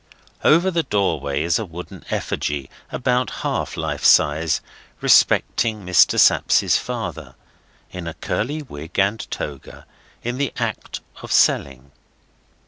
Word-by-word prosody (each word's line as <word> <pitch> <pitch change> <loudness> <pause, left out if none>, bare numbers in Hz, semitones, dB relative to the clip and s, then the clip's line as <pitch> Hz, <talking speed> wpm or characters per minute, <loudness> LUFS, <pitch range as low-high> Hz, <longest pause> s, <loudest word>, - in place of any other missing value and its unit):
Over 175 +5 +4
the 170 -1 +1
doorway 80 - -1
is 85 +5 +1
a 110 - -3
wooden 90 0 -10
effigy, 70 -2 -3 0.2
about 125 -2 0 0.2
half - - -2
life - - -3
size, 80 +1 +4 0.4
representing 110 -4 +3
Mr. 90 -1 +4
Sapsea's - - +4
father, - - -4 0.6
in 90 -2 -7
a 85 - -6
curly 150 +7 -3
wig 80 - -10
and 100 +3 0
toga, 70 -2 -7 0.4
in 120 +2 -3
the 140 - -1
act - - -4 0.2
of - - -8
selling. 70 0 +2
90 Hz, 125 wpm, -21 LUFS, 75-120 Hz, 0.6 s, Over